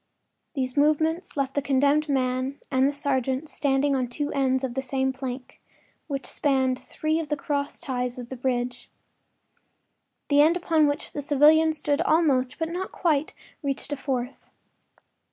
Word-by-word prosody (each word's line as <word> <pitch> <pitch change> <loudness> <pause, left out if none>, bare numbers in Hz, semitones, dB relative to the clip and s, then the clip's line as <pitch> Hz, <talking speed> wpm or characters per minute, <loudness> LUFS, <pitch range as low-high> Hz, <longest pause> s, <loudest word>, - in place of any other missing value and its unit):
These 255 -2 -2
movements 310 +4 +1
left 275 -1 0
the 285 - 0
condemned 285 +2 +2
man 260 0 0
and 260 0 +3
the - - +1
sergeant 270 0 -1
standing 280 0 +1
on 255 -1 +1
the - - -11
two 290 +4 -3
ends 265 -1 +1
of 255 -2 -2
the 265 - -1
same 265 0 -1
plank, 255 -1 -7 0.5
which 275 -3 -4
spanned 265 -3 +1
three 315 +1 -2
of 320 - -5
the 295 - 0
cross 285 0 -2
ties 250 -1 -3
of 245 -1 -7
the 260 - -5
bridge. 245 -1 -2 1.4
The 290 0 +5
end 325 +4 +4
upon 325 -4 +3
which 290 0 -3
the 290 - -3
civilian 305 +3 +5
stood 295 -1 -1
almost, 295 -7 +2
but 325 0 -2
not 360 +3 -4
quite, 310 -4 0 0.3
reached 280 0 -2
a - - 0
fourth. 265 -2 -4
280 Hz, 165 wpm, -25 LUFS, 260-300 Hz, 1.4 s, The